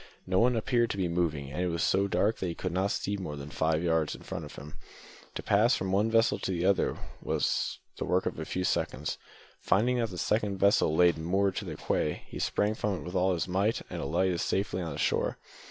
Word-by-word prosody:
No 95 Hz, 0 st, +2 dB
one 125 Hz, +1 st, +4 dB
appeared 120 Hz, +1 st, +1 dB
to -, -, -3 dB
be 95 Hz, -2 st, +1 dB
moving, 80 Hz, -5 st, -1 dB
and 90 Hz, -, -3 dB
it 90 Hz, -, +1 dB
was 85 Hz, -1 st, -1 dB
so 100 Hz, +1 st, +2 dB
dark 100 Hz, +4 st, +1 dB
that 95 Hz, -, -2 dB
he 85 Hz, -, -3 dB
could 90 Hz, -, -3 dB
not 95 Hz, +3 st, +1 dB
see 100 Hz, 0 st, -2 dB
more 85 Hz, -6 st, -5 dB
than 70 Hz, +1 st, -8 dB
four 80 Hz, -, -1 dB
or -, -, +4 dB
five 80 Hz, +2 st, 0 dB
yards 80 Hz, -3 st, +1 dB
before -, -, -6 dB
him. 75 Hz, -1 st, -9 dB, 0.6 s
To -, -, -4 dB
pass 110 Hz, +5 st, +4 dB
from 95 Hz, 0 st, -2 dB
one 105 Hz, +3 st, +2 dB
vessel 115 Hz, 0 st, +3 dB
to -, -, -3 dB
the 90 Hz, -1 st, -1 dB
other 100 Hz, 0 st, +2 dB, 0.2 s
was -, -, 0 dB, 0.2 s
the -, -, -3 dB
work 90 Hz, +1 st, +1 dB
of -, -, -3 dB
a 80 Hz, -, -4 dB
few 90 Hz, -, -2 dB
seconds. -, -, -1 dB, 0.4 s
Finding 120 Hz, +7 st, +2 dB
that 115 Hz, -2 st, 0 dB
the 90 Hz, -, -8 dB
second 105 Hz, 0 st, 0 dB
vessel 100 Hz, -5 st, +3 dB
lay 90 Hz, +1 st, +6 dB
moored 95 Hz, +4 st, 0 dB
to -, -, -3 dB
the -, -, -5 dB
quay, 75 Hz, -, -1 dB
he -, -, -8 dB
sprang 105 Hz, +1 st, +1 dB
from 105 Hz, -2 st, -1 dB
it -, -, -7 dB
with 90 Hz, -, -6 dB
all 95 Hz, 0 st, +2 dB
his 85 Hz, -, -2 dB
might 100 Hz, +5 st, 0 dB
and -, -, -4 dB
alighted 95 Hz, -2 st, +1 dB
safely 95 Hz, 0 st, -1 dB
on 85 Hz, -2 st, -4 dB
the 70 Hz, -, -6 dB
shore. -, -, 0 dB
95 Hz, 240 wpm, -29 LUFS, 85-100 Hz, 0.6 s, lay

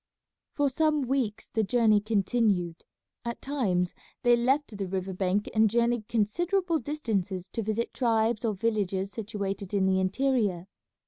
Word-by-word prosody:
For 290 Hz, -1 st, +2 dB
some 300 Hz, +1 st, +1 dB
weeks 250 Hz, -5 st, -1 dB
the 225 Hz, -, 0 dB
journey 220 Hz, -1 st, +3 dB
continued. 200 Hz, -5 st, 0 dB, 0.4 s
At 235 Hz, 0 st, -4 dB
times 195 Hz, -11 st, 0 dB, 0.3 s
they 240 Hz, -1 st, +6 dB
left 260 Hz, +1 st, +1 dB
the 200 Hz, -1 st, -3 dB
river 190 Hz, 0 st, -3 dB
bank 190 Hz, +2 st, 0 dB
and 220 Hz, 0 st, +4 dB
journeyed 235 Hz, -1 st, +1 dB
considerable 335 Hz, -, +1 dB
distances 205 Hz, -, -2 dB
to 230 Hz, -, -3 dB
visit 220 Hz, +2 st, -2 dB
tribes 230 Hz, -2 st, +1 dB
or 220 Hz, -3 st, 0 dB
villages 195 Hz, -2 st, -1 dB
situated 200 Hz, -2 st, -4 dB
in 195 Hz, -1 st, +3 dB
the 190 Hz, 0 st, +3 dB
interior. 195 Hz, -3 st, +1 dB
220 Hz, 140 wpm, -28 LUFS, 195-245 Hz, 0.4 s, they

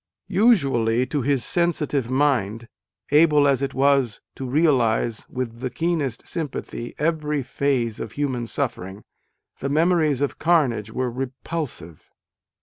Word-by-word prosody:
Usually, 135 Hz, -, +3 dB
to 145 Hz, +1 st, -2 dB
his 135 Hz, -2 st, 0 dB
sensitive 150 Hz, -7 st, 0 dB
mind, 125 Hz, -5 st, +1 dB, 0.4 s
able 150 Hz, -1 st, +5 dB
as 140 Hz, -1 st, +2 dB
it 140 Hz, -1 st, -2 dB
was 135 Hz, -4 st, +2 dB
to 130 Hz, -2 st, -6 dB
realise 125 Hz, -7 st, +1 dB
with 120 Hz, -3 st, -4 dB
the 130 Hz, +1 st, -3 dB
keenest 155 Hz, -6 st, -2 dB
sympathy 140 Hz, -6 st, -5 dB
every 150 Hz, -2 st, 0 dB
phase 125 Hz, -4 st, -1 dB
of -, -, -6 dB
human 130 Hz, -5 st, -2 dB
suffering, 100 Hz, -7 st, -4 dB, 0.6 s
the 135 Hz, -, -2 dB
memories 155 Hz, -2 st, +2 dB
of 145 Hz, -, -1 dB
carnage 135 Hz, -11 st, +2 dB
were 125 Hz, +2 st, -2 dB
repulsive. 130 Hz, -, -6 dB
135 Hz, 125 wpm, -23 LUFS, 120-150 Hz, 0.6 s, able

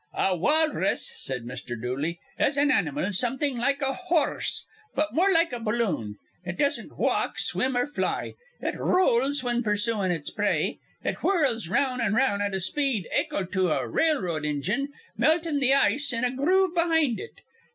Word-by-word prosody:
"A 190 Hz, -, +2 dB
walrus," 310 Hz, -, +1 dB
said 125 Hz, -, -3 dB
Mr. 120 Hz, -1 st, -6 dB
Dooley, 140 Hz, +8 st, -3 dB, 0.2 s
"is 280 Hz, -, +2 dB
an 290 Hz, +1 st, +4 dB
animal 290 Hz, -7 st, 0 dB
something 255 Hz, +5 st, -1 dB
like 275 Hz, +4 st, +1 dB
a 270 Hz, 0 st, +1 dB
hor 350 Hz, -3 st, 0 dB
rse, -, -, -1 dB, 0.3 s
but 305 Hz, +2 st, 0 dB
more 375 Hz, +5 st, +3 dB
like 330 Hz, -4 st, +3 dB
a 245 Hz, -, -3 dB
balloon. 210 Hz, -, -1 dB, 0.3 s
It 175 Hz, 0 st, -5 dB
doesn't 285 Hz, -1 st, -1 dB
walk, -, -, 0 dB
swim, 260 Hz, -1 st, 0 dB
or 245 Hz, -, +2 dB
fly. 295 Hz, +1 st, -2 dB, 0.3 s
It -, -, -3 dB
rowls 280 Hz, -5 st, +2 dB
whin 240 Hz, -1 st, 0 dB
pur 210 Hz, -3 st, +1 dB
suin' 205 Hz, -2 st, 0 dB
its 160 Hz, -4 st, -3 dB
prey. -, -, 0 dB, 0.2 s
It -, -, -2 dB
whirls 275 Hz, -, +1 dB
'round 255 Hz, +5 st, +1 dB
an' 215 Hz, -2 st, +1 dB
'round 225 Hz, -5 st, +2 dB
at 200 Hz, -1 st, -1 dB
a -, -, -1 dB
speed 245 Hz, -, -1 dB
akel 195 Hz, -, 0 dB
to 185 Hz, -2 st, +1 dB
a -, -, 0 dB
railroad 185 Hz, -, +1 dB
injine, 155 Hz, -, -1 dB, 0.3 s
meltin' 320 Hz, -2 st, +2 dB
th' 265 Hz, 0 st, +4 dB
ice 280 Hz, +1 st, +3 dB
in 230 Hz, 0 st, -1 dB
a 250 Hz, -, +2 dB
groove 365 Hz, +6 st, +2 dB
behind 325 Hz, -7 st, +2 dB
it. 455 Hz, -, -9 dB
255 Hz, 175 wpm, -26 LUFS, 195-295 Hz, 0.3 s, an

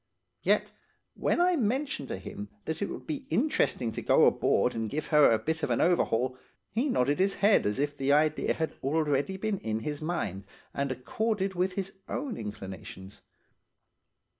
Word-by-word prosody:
"Yet, -, -, +2 dB, 0.4 s
when -, -, 0 dB
I 360 Hz, 0 st, +4 dB
mentioned 255 Hz, -, -1 dB
to -, -, -4 dB
him 100 Hz, +2 st, -8 dB, 0.2 s
that 160 Hz, 0 st, -3 dB
it 200 Hz, -, -1 dB
would -, -, -7 dB
be 285 Hz, -4 st, -5 dB
interesting 225 Hz, -, +1 dB
to -, -, -5 dB
go -, -, +5 dB
aboard -, -, +3 dB
and 115 Hz, -1 st, -2 dB
give 155 Hz, +6 st, -3 dB
her 150 Hz, -1 st, +7 dB
a 115 Hz, -, +4 dB
bit 160 Hz, +6 st, -2 dB
of -, -, -1 dB
an -, -, +1 dB
overhaul, 130 Hz, -7 st, +2 dB, 0.3 s
he 250 Hz, +6 st, 0 dB
nodded 145 Hz, -, +1 dB
his 195 Hz, +1 st, +2 dB
head 205 Hz, -, +4 dB
as 105 Hz, -, -1 dB
if 145 Hz, +1 st, -1 dB
the 135 Hz, -1 st, 0 dB
idea 155 Hz, +1 st, +2 dB
had 160 Hz, -1 st, -1 dB
been -, -, -24 dB
already 150 Hz, +4 st, 0 dB
in 190 Hz, -, -2 dB
his 150 Hz, +4 st, -4 dB
mind 105 Hz, -, -3 dB, 0.3 s
and 140 Hz, -1 st, -1 dB
accorded 195 Hz, -, -1 dB
with 185 Hz, +1 st, 0 dB
his 195 Hz, 0 st, -4 dB, 0.2 s
own 270 Hz, -5 st, -3 dB
inclinations. 95 Hz, -2 st, -8 dB
155 Hz, 175 wpm, -29 LUFS, 125-200 Hz, 0.4 s, her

